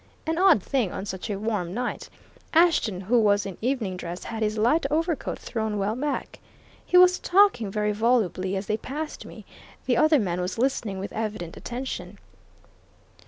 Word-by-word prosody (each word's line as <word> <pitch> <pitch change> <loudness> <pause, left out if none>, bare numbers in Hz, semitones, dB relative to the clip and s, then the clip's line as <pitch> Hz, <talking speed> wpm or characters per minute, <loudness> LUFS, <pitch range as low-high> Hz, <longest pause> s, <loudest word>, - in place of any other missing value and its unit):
An 325 +1 -1
odd 365 - +5
thing, 245 -9 0
on 195 - -5
such 190 +2 -5
a 205 - -2
warm 205 -4 -2
night 245 +1 -3 0.5
Ashton, 320 - +3
who 230 +6 +2
was 205 -2 +3
in 195 -2 -5
evening 225 -7 -1
dress, 175 0 -6
had 225 -1 -5
his 215 0 0
light 245 +10 +3
overcoat 320 0 -1
thrown 220 -2 -3
well 205 +2 -1
back. 290 +3 -3 0.4
He 360 - +3
was 365 0 +6
talking 375 - +3
very 210 +1 0
volubly 205 -4 +1
as 195 +1 -3
they 215 +1 -1
passed 300 +6 -6
me - - -12 0.4
the 245 -2 +2
other 310 +3 +5
man 180 -7 -1
was 180 +4 -3
listening 230 -5 -1
with 195 +1 -6
evident 210 -6 -4
attention." 255 +2 -6
220 Hz, 170 wpm, -25 LUFS, 195-275 Hz, 0.5 s, was